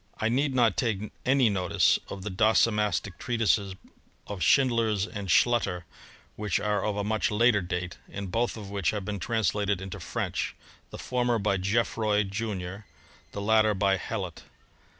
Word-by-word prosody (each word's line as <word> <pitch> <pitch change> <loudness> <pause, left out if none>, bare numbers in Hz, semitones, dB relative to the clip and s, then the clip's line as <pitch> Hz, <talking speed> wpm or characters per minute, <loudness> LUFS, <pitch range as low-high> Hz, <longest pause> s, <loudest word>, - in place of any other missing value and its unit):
' - - -32
I 110 - 0
need 135 +3 +1
not 115 -5 +3
take 110 -4 -1 0.2
any 130 -2 +4
notice 95 -2 +2
of 95 -1 -7
the 105 - -4
docimastic 105 -1 +2
treatises 110 -5 0 0.5
of 100 -2 -6
Schindlers 115 -6 +3
and 100 -2 -6
Schlutter, 95 -3 +2 0.5
which 105 -4 -1
are 105 -1 0
of 105 -1 -1
a 105 - -1
much 110 +1 0
later 105 0 +3
date, 90 0 -4
and 100 -2 -6
both 115 +2 0
of 100 -2 -8
which 100 -3 0
have 105 -3 -3
been 105 -1 -3
translated 105 -2 0
into 95 0 -7
French, - - -3 0.3
the - - -8
former 120 -1 0
by 100 -2 +1
GeofFroy, 105 +1 +1
junior; 100 -2 -4 0.5
the 100 - -4
latter 110 0 +4
by 95 0 +2
Hellot. - - -5
105 Hz, 160 wpm, -27 LUFS, 95-115 Hz, 0.5 s, any